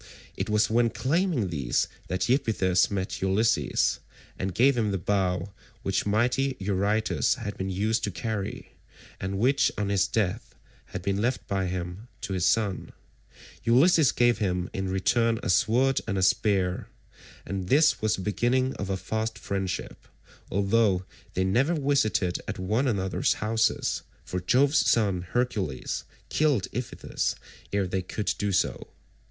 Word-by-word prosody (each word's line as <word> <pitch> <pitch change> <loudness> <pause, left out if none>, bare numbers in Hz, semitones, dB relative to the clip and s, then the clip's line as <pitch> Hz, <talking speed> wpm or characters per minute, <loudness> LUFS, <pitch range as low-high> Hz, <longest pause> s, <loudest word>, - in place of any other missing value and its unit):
It - - -3
was 105 0 +3
when 115 +1 +3
claiming 145 - 0
these 70 -7 0 0.2
that 90 +1 -1
Iphitus 110 -8 +2
met 95 -2 -3
Ulysses, 95 +4 +2 0.4
and 95 -1 -3
gave 135 +3 +4
him 110 -3 +1
the 100 - 0
bow 95 0 -1 0.3
which 95 +1 0
mighty 125 +5 +1
Eurytus 100 +5 +1
had 110 -5 -5
been 95 0 -3
used 110 +4 0
to - - -2
carry, 100 +2 -4 0.5
and 95 +1 -3
which 130 +4 +3
on 105 -1 -1
his 100 -1 +2
death 105 -6 -2 0.3
had 90 - -7
been 100 +1 0
left 125 +3 -1
by 95 -1 -1
him 90 +4 -5
to 95 - -4
his 90 -2 +1
son. 105 -4 0 0.7
Ulysses 135 +3 +5
gave 120 -1 +2
him 90 -3 -1
in 95 0 -2
return 115 +4 +1
a - - +1
sword 125 +8 +3
and 100 -3 -1
a 95 - +1
spear, 95 -1 +1 0.6
and 95 -2 -4
this 150 +3 +4
was 110 -3 +2
the - - -6
beginning 125 +5 +1
of 100 - -4
a 95 - 0
fast 110 +3 -3
friendship, 95 -2 -4 0.4
although 100 -1 +2 0.3
they 95 - +1
never 125 - +2
visited 135 - +1
at - - -4
one 110 +9 0
another's 95 -5 +1
houses, 110 +1 0 0.2
for 90 - -3
Jove's 135 - +3
son 100 -6 +2
Hercules 95 - -2 0.2
killed 145 -10 +2
Iphitus 125 +2 -3 0.4
ere 100 -1 +1
they 95 +1 -2
could 100 +3 -2
do 105 0 0
so. 95 - 0
105 Hz, 150 wpm, -27 LUFS, 95-120 Hz, 0.7 s, Ulysses